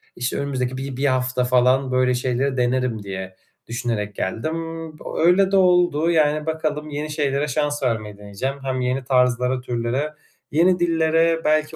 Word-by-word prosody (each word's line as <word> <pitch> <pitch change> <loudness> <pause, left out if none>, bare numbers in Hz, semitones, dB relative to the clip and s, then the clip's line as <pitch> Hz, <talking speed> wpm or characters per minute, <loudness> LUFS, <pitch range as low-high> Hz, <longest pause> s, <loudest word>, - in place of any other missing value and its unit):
işte, 125 +1 -2
önümüzdeki 130 -2 -2
bir 135 -1 -5
bir 140 - 0
hafta 130 -1 +1
falan 125 +1 +3
böyle 130 0 +2
şeyleri 130 +2 -1
denerim 125 -3 0
diye 95 -1 -6 0.3
düşünerek 115 -3 -3
geldim. 115 +11 -2 0.5
B - - -12
öyle 185 +3 +4
de 195 - +4
oldu, 175 -3 +3
yani, 155 -1 +2
bakalım 155 -1 -2
yeni 150 +1 -4
şeylere 145 -1 0
şans 145 0 -1
vermeyi 110 -4 -2
deneyeceğim. 105 +7 -4
Hem 130 -1 -2
yeni 125 +1 -1
tarzlara 125 0 +2
türlere, 125 +5 -2 0.4
yeni 175 +4 +3
dillere 165 -1 +2
belki 155 +1 +1
135 Hz, 155 wpm, -22 LUFS, 125-155 Hz, 0.5 s, öyle